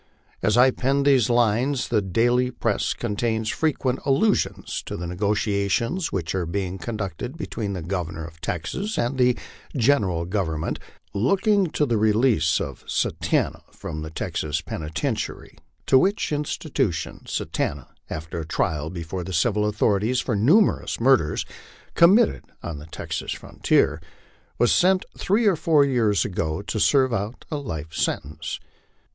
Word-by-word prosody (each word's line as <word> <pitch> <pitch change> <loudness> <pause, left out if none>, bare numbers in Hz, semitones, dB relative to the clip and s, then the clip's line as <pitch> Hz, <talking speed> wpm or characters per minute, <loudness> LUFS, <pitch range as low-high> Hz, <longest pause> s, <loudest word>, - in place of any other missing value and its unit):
As 110 +2 +2
I 130 +2 +7
pen 135 +2 +1
these 135 -5 +4
lines, 120 +3 +2
the 110 -3 +2
daily 120 +6 +2
press 115 -4 -1
contains 110 0 -1
frequent 135 -5 0
allusions 145 +10 +1
to - - -4
the 90 - -5
negotiations 105 - 0
which 85 -4 -2
are 90 -3 -1
being 95 +1 -3
conducted 105 - -5
between 110 -10 -4
the 90 -4 -4
Governor 85 -3 -3
of 80 -1 -13
Texas 140 - -3
and 120 +3 0
the 125 -1 +4 0.4
General 105 -10 +2
Government, 85 -4 -2 0.3
looking 195 - +2
to 155 -2 0
the 115 -5 +1
release 110 -6 +3
of 70 - -5
Satanta - - 0
from 80 - -6
the 80 - -5
Texas 80 0 -2
penitentiary, 80 -2 -4 0.3
to 130 - +6
which 195 +1 +1
institution 150 0 -2
Satanta, 70 -3 -2 0.2
after 80 +2 -5
a 80 - -5
trial 75 -1 -1
before 85 +1 -5
the 95 - -6
civil 105 +5 +2
authorities 105 +3 +1
for 120 - -1
numerous 160 - +3
murders 115 - +3 0.5
committed 200 +7 +5 0.2
on 80 -4 -5
the 75 - -11
Texas - - -4
frontier, 75 +2 +1 0.6
was 120 - +3
sent 185 +1 +3
three 215 +5 +1
or 200 -4 +5
four 155 -3 +4
years 115 -7 +2
ago 80 -2 -2
to 110 - -3
serve 130 +1 +4
out 105 +3 -3
a 150 - -1
life 80 - -6
sentence. 75 0 -3
110 Hz, 140 wpm, -24 LUFS, 85-135 Hz, 0.6 s, I